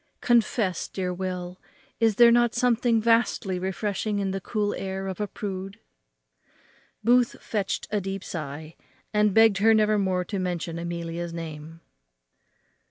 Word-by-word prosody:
Confess, 225 -6 +1
dear 185 -2 -3
Will, 180 0 -5 0.4
is 225 -3 +3
there 235 +1 +7
not 240 0 +3
something 240 -1 +2
vastly 230 -4 +1
refreshing 205 +3 -2
in 195 -1 -1
the 195 0 -3
cool 210 +1 -1
air 190 0 -4
of 190 +1 -4
a 210 - -1
prude?" 195 0 -6 1.2
Booth 245 +1 +3
fetched 205 -3 -3
a 210 -1 0
deep 195 0 -5
sigh, 155 0 -6 0.4
and 210 0 +3
begged 225 -1 +5
her 220 +2 +5
never 215 -1 +3
more 185 -2 0
to 200 0 -3
mention 170 -2 -3
Amelia's 170 0 -4
name. 165 0 -8
195 Hz, 140 wpm, -26 LUFS, 180-220 Hz, 1.2 s, there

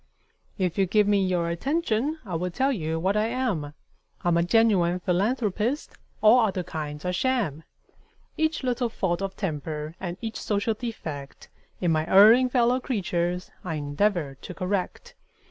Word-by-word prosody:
If 185 -2 -1
you 190 - +3
give 210 +2 +3
me 200 -1 +3
your 180 -2 0
attention, 275 - -1
I 185 - -6
will 175 +2 -1
tell 265 +10 +1
you 160 - -2
what 190 +4 +1
I 210 +1 +2
am: 215 - -2 0.5
I'm 175 -1 +2
a 170 - +3
genuine 180 -2 +3
philanthropist 215 - 0 0.3
all 220 +3 +7
other 195 -5 +1
kinds 150 -2 -6
are 180 - 0
sham. 200 - 0 0.7
Each 315 -2 0
little 245 -1 0
fault 190 -5 -1
of 195 -1 -3
temper 155 -4 -4
and 175 -1 -5
each 225 -1 -5
social 205 +2 0
defect 160 - -7 0.3
In 175 -2 +2
my 155 0 +1
erring 225 +6 +7
fellow 245 0 +3
creatures, 180 -7 -2
I 165 -3 -3
endeavor 145 -1 -1
to 180 - -8
correct. 185 0 -3
190 Hz, 155 wpm, -26 LUFS, 170-230 Hz, 0.7 s, all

